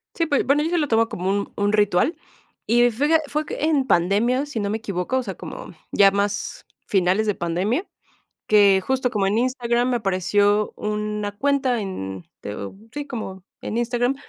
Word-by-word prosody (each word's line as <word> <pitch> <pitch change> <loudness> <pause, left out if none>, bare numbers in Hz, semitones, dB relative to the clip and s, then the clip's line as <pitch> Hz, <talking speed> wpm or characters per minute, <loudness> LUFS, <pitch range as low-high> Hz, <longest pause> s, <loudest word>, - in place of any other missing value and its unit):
Sí, 330 - 0
pues, 285 -2 +1
bueno, 280 +3 +3
yo 320 - 0
ya 350 - +1
lo 300 -3 +1
tomo 225 -1 +2
como 185 +2 -3
un 200 0 -1
un 205 +1 0
ritual. 205 - +2 0.5
Y 240 +2 +4
fue 265 +7 0
que 320 - +6
fue 300 +2 -2
que 295 - -5
en 295 -4 +2
pandemia, 215 +10 +2
si 285 -6 -5
no 200 -1 -1
me 215 - -1
equivoco, 200 +2 -2
o 255 - 0
sea, 195 - -5
como 175 - -9 0.2
ya 195 -1 +6
más 200 0 -2 0.2
finales 190 +2 +2
de 205 - +1
pandemia, 190 - -1 0.6
que 200 -2 +5
justo 260 -1 +1
como 205 -3 0
en 205 +3 +1
Instagram 245 0 +1
me 245 - +2
apareció 205 0 +1
una 210 -1 -3
cuenta 270 -3 +1
en, 95 - -6
te - - -6
digo, 100 - -7 0.2
sí, 290 0 -5
como 195 -8 -6 0.2
en 220 - -4
Instagram, 240 +2 +1
215 Hz, 195 wpm, -23 LUFS, 195-255 Hz, 0.6 s, que